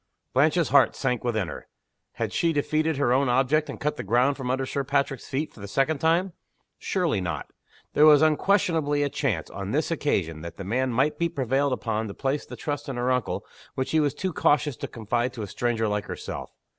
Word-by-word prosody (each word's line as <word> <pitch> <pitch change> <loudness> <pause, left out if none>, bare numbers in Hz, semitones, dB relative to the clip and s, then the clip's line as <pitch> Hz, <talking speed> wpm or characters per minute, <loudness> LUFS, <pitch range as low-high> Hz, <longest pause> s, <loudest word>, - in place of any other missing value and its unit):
Blanche's 155 +4 +3
heart 140 -1 +5
sank 125 -3 -1
within 110 -6 0
her. - - -8 0.5
Had - - -3
she 170 - +2
defeated 155 +1 0
her 130 -3 +2
own 135 0 +2
object, 135 +5 +2
and - - -6
cut 150 +1 -1
the - - -4
ground 125 +7 +2
from 130 -2 -5
under 130 +1 0
Sir 140 +1 -2
Patrick's 140 -1 -1
feet, 145 +3 -2
for - - -16
the 100 - -7
second 135 +8 +1
time? 170 +4 +2 0.5
Surely 170 - 0
not! 80 -5 -4 0.4
There 150 +1 +6
was 150 0 +7
unquestionably 155 -3 +2
a 145 - 0
chance, 110 - -2
on 100 0 -5
this 155 +3 0
occasion, 90 - -1
that 85 0 -8
the 100 - -6
man 125 +6 0
might 135 +6 +1
be 170 0 +1
prevailed 140 -2 0
upon 110 -3 -1
to 100 - -7
place 140 +1 -2
the - - -8
trust 145 -1 -4
in 135 - -3
her 120 +1 0
uncle 125 -1 -1 0.3
which 130 - -2
he 160 - +3
was 145 -2 +1
too 185 -2 -3
cautious 145 -2 +2
to - - -5
confide 120 +2 -2
to 115 - -5
a - - -5
stranger 115 +1 -1
like 105 0 -1
herself. - - -6
135 Hz, 215 wpm, -26 LUFS, 120-150 Hz, 0.5 s, was